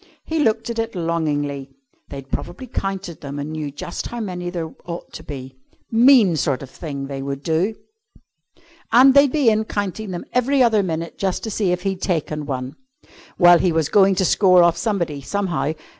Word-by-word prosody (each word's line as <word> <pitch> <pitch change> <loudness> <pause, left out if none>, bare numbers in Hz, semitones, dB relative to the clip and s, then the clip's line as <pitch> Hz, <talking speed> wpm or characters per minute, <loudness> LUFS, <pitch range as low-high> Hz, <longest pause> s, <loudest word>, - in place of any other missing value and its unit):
He 320 0 -2
looked 225 -5 +1
at 230 - -4
it 225 -2 -3
longingly. 145 -5 -2 0.4
They'd 135 -1 -9
probably 260 - -5
counted 195 -7 -4
them 140 0 -6
and 145 +2 -4
knew 155 -2 -4
just 145 +4 -6
how 240 - -6
many 180 -5 -4
there 170 -3 -5
ought 170 0 -7
to - - -8
be. 130 -2 -9 0.3
Mean 230 -6 +6
sort 140 -2 -1
of 135 - -11
thing 140 -4 -6
they 135 -1 -5
would 140 0 -5
do. 175 +7 0 1.2
And 260 +4 +7
they'd 280 -1 +6
be 275 -6 +3
in 215 0 +1
counting 205 0 -4
them 175 -2 -5
every 260 +2 +3
other 220 -3 +3
minute 165 -3 -4
just 190 -2 -1
to 220 - -4
see 195 -3 0
if 180 0 -2
he'd 190 -2 -2
taken 155 -4 -2
one. 130 -1 -4 0.6
Well, 175 -2 +7
he 180 - +2
was 160 -2 0
going 195 -1 +4
to 190 0 +1
score 185 -1 +5
off 170 -1 +4
somebody, 170 -8 -2
somehow. 175 -2 -2
175 Hz, 190 wpm, -21 LUFS, 150-215 Hz, 1.2 s, And